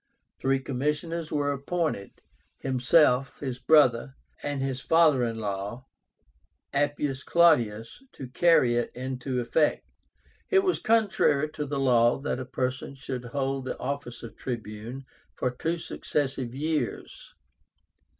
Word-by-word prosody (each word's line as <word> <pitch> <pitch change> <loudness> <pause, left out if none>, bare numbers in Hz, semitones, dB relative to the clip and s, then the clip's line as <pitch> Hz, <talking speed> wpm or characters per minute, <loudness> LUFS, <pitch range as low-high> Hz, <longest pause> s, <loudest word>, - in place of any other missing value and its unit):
Three 135 0 +1
commissioners 150 +5 -2
were 145 -1 +1
appointed, 140 - -3 0.4
himself, 130 0 +2
his 130 -3 -4
brother, 135 -4 +4 0.3
and 145 -1 -3
his 135 -1 -2
father 155 -5 +4
in 115 -1 -2
law, 105 +4 -4 0.9
APPIUS 145 -1 0
CLAUDIUS, 120 - +2
to 130 - -8
carry 125 -5 +4
it 120 - 0
into 130 0 -3
effect. 150 +6 +1 0.6
It 385 -1 +4
was 370 -2 +1
contrary 200 -10 +2
to 150 -2 -4
the 140 0 -2
law 120 -3 +4
that 135 -2 -3
a 130 - -5
person 130 +1 -3
should 130 -2 -6
hold 135 +1 -2
the - - -4
office 140 -4 -5
of 115 -2 -9
Tribune 115 +2 -6 0.3
for 125 - -1
two 165 +7 -2
successive 135 -6 -3
years. 155 +2 -3
135 Hz, 125 wpm, -27 LUFS, 125-150 Hz, 0.9 s, brother